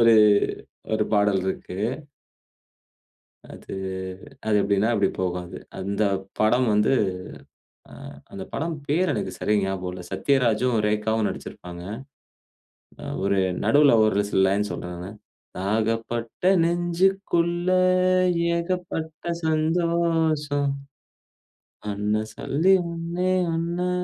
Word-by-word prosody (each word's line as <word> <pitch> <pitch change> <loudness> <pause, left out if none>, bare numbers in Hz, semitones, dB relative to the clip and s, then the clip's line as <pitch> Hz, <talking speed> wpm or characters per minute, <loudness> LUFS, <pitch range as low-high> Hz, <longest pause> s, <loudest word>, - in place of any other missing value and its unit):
ஒரு 115 -1 +7 0.8
ஒரு 110 -1 +2
பாடல் 100 -2 +3
இருக்கு. 90 -1 -4 1.7
அது, - - -10 0.7
அது 105 - +3
எப்டீன்னா, 100 +2 +2
இப்டி 100 -2 +3
போகும் 90 -1 -1
அது. - - -9 0.2
அந்த 100 +2 -1 0.4
படம் 120 +4 +3
வந்து 105 +3 +3 1.0
அ - - -13 0.4
அந்த 95 - -6
படம் 165 +1 -2
பேரு 175 +6 +2
எனக்கு 95 - -3
சரியா 105 0 +1
ஞாபகம் 95 -1 -3
இல்ல. 90 - -7
சத்யராஜும், 125 -3 +2
ரேகாவும் 105 +1 +1
நடிச்சுருப்பாங்க. 90 0 -7 1.2
அ - - -9 0.2
ஒரு 100 0 +2 0.2
நடுவுல 145 -2 +5
ஒரு 105 -1 +3
சில 95 - +1
லைன் 100 +2 +2
சொல்றேன் 90 0 -5
நானு, 90 +2 -7 0.5
"தாகப்பட்ட 115 - -2 0.2
நெஞ்சுக்குள்ள 175 0 +1 0.9
ஏகப்பட்ட 170 -2 -3 0.2
சந்தோஷம். 160 -3 +1 1.2
என்ன 105 +1 0
சொல்லி 175 +7 +2 0.2
ஒண்ணே 170 +2 -2 0.2
ஒண்ணு 170 +2 -1
120 Hz, 100 wpm, -24 LUFS, 100-170 Hz, 1.7 s, ஒரு